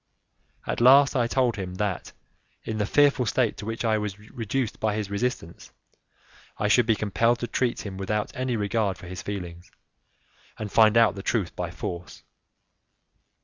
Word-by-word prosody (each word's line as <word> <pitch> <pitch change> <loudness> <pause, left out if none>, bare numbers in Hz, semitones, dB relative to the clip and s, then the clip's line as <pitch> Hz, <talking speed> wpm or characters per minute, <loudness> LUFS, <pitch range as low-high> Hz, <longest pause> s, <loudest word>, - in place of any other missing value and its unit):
At - - -2
last 135 +3 +6
I 120 -2 +2
told 125 -2 +1
him 90 -2 -5
that, 100 -2 -3 0.5
in 110 -1 -4
the 105 - 0
fearful 145 -3 +3
state 120 0 +1
to 105 - -7
which 115 +1 -3
I 110 -1 +2
was 105 -2 -4
reduced 115 +3 -4
by 110 -1 0
his 105 -2 -4
resistance, 100 -5 -3 0.9
I 105 - 0
should 115 +2 +4
be 110 - +4
compelled 115 +3 +1
to 120 - -2
treat 120 0 -1
him 95 -2 -6
without 105 +2 -2
any 130 -1 -1
regard 105 -2 0
for - - -12
his 90 +1 -7
feelings, 90 -3 -7 0.9
and 105 -2 -5
find 110 0 +5
out 115 -2 +5
the 100 - -7
truth 100 -4 -1
by 90 -1 -3
force. 85 +1 -7
110 Hz, 170 wpm, -26 LUFS, 100-120 Hz, 0.9 s, last